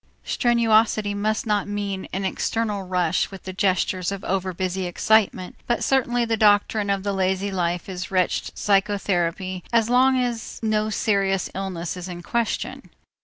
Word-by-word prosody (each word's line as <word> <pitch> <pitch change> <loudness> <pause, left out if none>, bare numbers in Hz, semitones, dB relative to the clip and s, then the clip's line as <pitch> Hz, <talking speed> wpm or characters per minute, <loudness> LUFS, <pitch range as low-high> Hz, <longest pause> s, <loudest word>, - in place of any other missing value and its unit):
Strenuosity 225 -3 +2
must 215 +2 -1
not 210 -2 0
mean 200 -2 -3
an 195 +1 -2
external 210 +1 -1
rush 180 -2 0
with 195 -1 -11
the 185 - -6
gestures 185 -1 0
of 200 -1 -5
overbusy 185 0 -2
excitement, 190 0 +1
but 240 - 0
certainly 245 -3 +2
the 225 -1 0
doctrine 205 -1 +3
of 195 -1 0
the 200 0 -1
lazy 190 +1 0
life 175 -2 -1
is 185 -1 -5
wretched 185 -2 0
psychotherapy, 190 -3 0
as 230 0 +2
long 260 +1 +5
as 240 -2 -3
no 215 -1 +1
serious 195 -3 0
illness 185 -3 -4
is 180 0 -7
in 175 -1 -7
question. 235 +4 -2
200 Hz, 150 wpm, -23 LUFS, 185-215 Hz, -, long